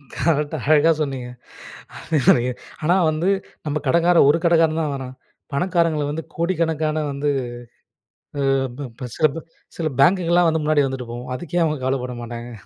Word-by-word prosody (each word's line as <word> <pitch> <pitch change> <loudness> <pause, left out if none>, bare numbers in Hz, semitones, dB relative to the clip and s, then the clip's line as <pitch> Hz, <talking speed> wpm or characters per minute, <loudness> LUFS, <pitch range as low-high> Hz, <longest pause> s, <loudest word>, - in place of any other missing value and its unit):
Correct 150 0 0
அழகா 155 +2 +5
சொன்னீங்க. 135 -4 -3 1.6
ஆனா 170 +4 +3 0.2
வந்து 155 +4 -1 0.4
நம்ம 150 0 -1
கடங்காரன் 170 +2 +4
ஒரு 160 - +3
கடங்காரன் 165 -1 +3
தான் 150 -3 -1
வேணாம், 130 -1 -7 0.4
பணக்காரங்கள 165 -2 +1
வந்து 160 +2 -4
கோடிக்கணக்கான 160 -3 0
வந்து, 145 +1 -1 1.9
சில 155 - +4 0.5
சில 170 - -2
ப 130 - -10
பேங்குகள்லாம் 175 +1 +4
வந்து 160 -1 0
முன்னாடி 150 -1 +3
வந்துட்டு 130 -3 -6
போகும். 125 +2 -7
அதுக்கே 175 +4 -2
அவங்க 155 -2 0
கவலைப்பட 130 -1 -1
மாட்டாங்க. 120 +1 -7
155 Hz, 130 wpm, -21 LUFS, 140-165 Hz, 1.9 s, அழகா